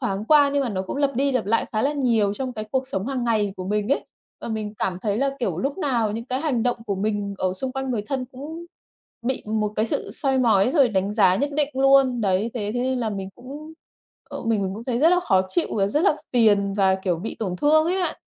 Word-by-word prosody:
thoáng 210 -5 -2
qua, 290 +1 +5
nhưng 285 -1 +2
mà 250 - -1
nó 190 -3 -2
cũng 190 - -5
lặp 280 -2 +1
đi 275 +2 +1
lặp 255 -4 0
lại 230 +2 +1
khá 215 -1 0
là 285 +2 +1
nhiều 230 -8 +1
trong 260 0 -4
cái 215 -1 -5
cuộc 265 -1 -1
sống 195 -2 -3
hàng 260 -3 -2
ngày 215 -4 +1
của 185 - -5
mình 210 +2 -1
ấy - - -1 0.4
và - - -6
mình 215 -1 -4
cảm 180 -1 -1
thấy 205 -2 0
là, 275 +3 +1
kiểu, 245 - -2
lúc 275 +7 -2
nào 235 - 0
những 230 +2 -4
cái 255 +1 -3
hành 265 -8 0
động 245 - +1
của 200 - -1
mình 205 0 -2
ở 185 -1 0
xung 255 +7 -4
quanh 265 0 -3
người 220 -4 -1
thân 265 -2 -2
cũng 295 +7 -9 0.6
bị 260 - -1
một 215 -1 -1
cái 215 - +2
sự - - -3
soi 270 -1 0
mói, 230 -2 +4
rồi 280 -5 +4
đánh 195 -1 0
giá 190 -4 +4
nhất 285 +5 -1
định 295 -2 +2
luôn. 270 -2 +4
Đấy, 200 +2 +1
thế 210 -4 -2
thế 245 - 0
nên 260 0 0
là 225 -2 -1
mình 195 -2 -5
cũng, 285 +6 -10 0.6
ờ, - - -6
mình 220 -3 +1
mình 190 0 -2
cũng 225 +3 -8
thấy 245 -2 -1
rất 315 +5 +5
là 360 0 +4
khó 190 - +3
chịu 340 - 0
và 195 - +2
rất 290 +10 0
là 310 - +4 0.2
phiền 205 -4 +3
và, 190 -2 +3
kiểu, 190 -2 -1
bị 215 +7 -6
tổn 185 -5 -3
thương 310 - +4
ấy 360 +3 0
bạn. 355 - -1
235 Hz, 265 wpm, -23 LUFS, 205-270 Hz, 0.6 s, qua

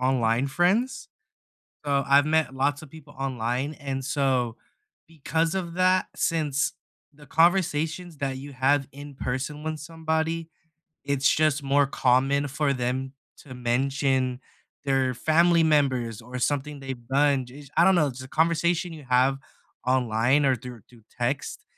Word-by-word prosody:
online 125 -1 +1
friends, 195 - 0 0.8
so, 140 -1 +1
I've 140 +1 +5
met 155 -3 +1
lots 145 +2 0
of 155 - -12
people 160 -1 -14
online, 130 +2 -2
and 135 -2 -4
so, 130 -5 0 0.5
because 160 +1 -1
of 175 -3 -3
that, 185 0 +3
since 150 -4 0 0.4
the 145 0 -16
conversations 165 0 +1
that 135 -2 -3
you 140 +1 -9
have 135 +1 +2
in 145 +1 -10
person 135 +4 -4
with 155 0 -4
somebody, 160 +1 -2 0.6
it's, 140 -1 +1
just, 155 -2 +2
more 140 0 +3
common 135 +1 +2
for 145 +1 0
them 130 +1 -2 0.3
to 130 - -11
mention 130 +1 0 0.4
their 135 -2 +1
family 165 +6 +3
members 130 -8 +1
or 125 +2 -7
something 145 +3 -1
they've 135 -3 -7
done 140 -1 +2
j 140 +4 -12
I - - +6
don't 190 0 +5
know, 150 -4 +3
the 130 +1 -9
conversation 170 +3 +1
you 155 -3 -10
have 130 +2 +3 0.5
online 125 +2 +2
or 135 - +4
through 120 -1 -10
through 120 -3 -19 0.2
text 125 +4 -2
140 Hz, 145 wpm, -26 LUFS, 130-155 Hz, 0.8 s, I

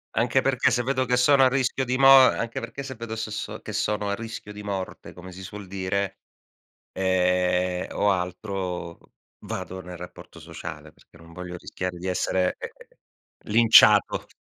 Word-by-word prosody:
Anche - - +2
perché - - +2
se 120 - +1
vedo 130 +1 0
che 125 0 +1
sono 135 +2 +5
a 130 - +5
rischio 130 0 0
di 125 +1 -1
mo 135 0 +5
anche 120 -3 +3
perché 115 +4 -7
se 135 -1 -7
vedo 115 -1 -6
se 110 -1 -4
so 105 - -5
che - - -8
sono 105 -1 -1
a 100 - 0
rischio 115 -1 -8
di 105 0 -9
morte, 95 -2 -6
come 90 +1 -11
si 95 +1 -10
suol 100 +1 -9
dire, 95 +1 -3 0.8
ehm, 90 -1 +1
o 105 - +1
altro, 90 -2 -4 0.4
vado 95 0 -6
nel 90 -1 -9
rapporto 90 +1 -11
sociale, - - -9
perché - - -22
non 85 0 -16
voglio 90 0 -7
rischiare 90 0 -5
di 90 +2 -6
essere, 90 0 0
ehm, - - -6 0.8
linciato. 115 +1 +6
100 Hz, 170 wpm, -25 LUFS, 90-115 Hz, 0.8 s, linciato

